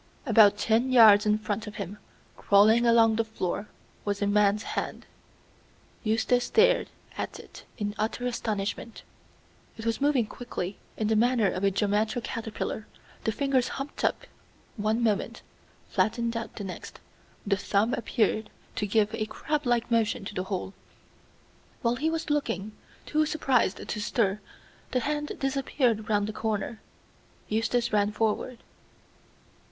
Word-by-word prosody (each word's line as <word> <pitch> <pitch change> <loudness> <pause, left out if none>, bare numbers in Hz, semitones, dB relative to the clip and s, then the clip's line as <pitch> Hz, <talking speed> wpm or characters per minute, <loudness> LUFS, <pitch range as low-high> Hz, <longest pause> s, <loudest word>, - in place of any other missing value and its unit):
About 215 -4 +6
ten 230 +5 +2
yards 215 -4 +7
in 210 0 +4
front 215 0 -3
of 210 - -8
him, 200 +1 -6 0.4
crawling 220 +4 +5
along 225 -1 +5
the 230 - +2
floor, 210 -2 -3 0.4
was 205 -1 -2
a 205 - +1
man's 205 +1 +3
hand. - - -4 1.0
Eustace 230 +2 +2
stared - - +3 0.3
at - - -4
it - - -13
in 205 -1 -2
utter 225 +3 -1
astonishment. 220 -2 -3 0.7
It 225 - -7
was 230 +1 -1
moving 280 -5 +3
quickly, 210 -5 -6 0.2
in 215 - 0
the 220 - +2
manner 230 -2 +3
of 185 - -4
a 200 - +5
geometer 210 +3 0
caterpillar, 220 -1 -4 0.4
the 220 - +2
fingers 265 +1 +1
humped 275 +1 -6
up - - +1 0.5
one 220 +1 0
moment, 215 -3 -1 0.5
flattened 235 +1 0
out 230 0 -5
the 205 - -6
next; 190 -2 -8 0.5
the 200 -1 +2
thumb 205 +3 +1
appeared 220 -2 0 0.3
to 210 - 0
give 215 +1 +2
a 215 -1 -2
crab 300 +3 -2
like 240 -1 +1
motion 225 -3 +1
to 205 - -6
the 185 -1 -3
whole. 190 0 -4 1.1
While 235 0 +2
he 310 +5 0
was 320 -2 -2
looking, 215 -9 -1 0.3
too 310 0 +1
surprised 265 -10 +1
to 210 - -3
stir, 210 -2 0 0.5
the 250 - +2
hand 295 +1 -2
disappeared 260 -5 0
round 205 -1 +2
the 215 - -4
corner. 220 0 -3 0.7
Eustace 225 +2 0
ran 205 0 +3
forward. 225 +3 -1
220 Hz, 145 wpm, -27 LUFS, 210-240 Hz, 1.1 s, yards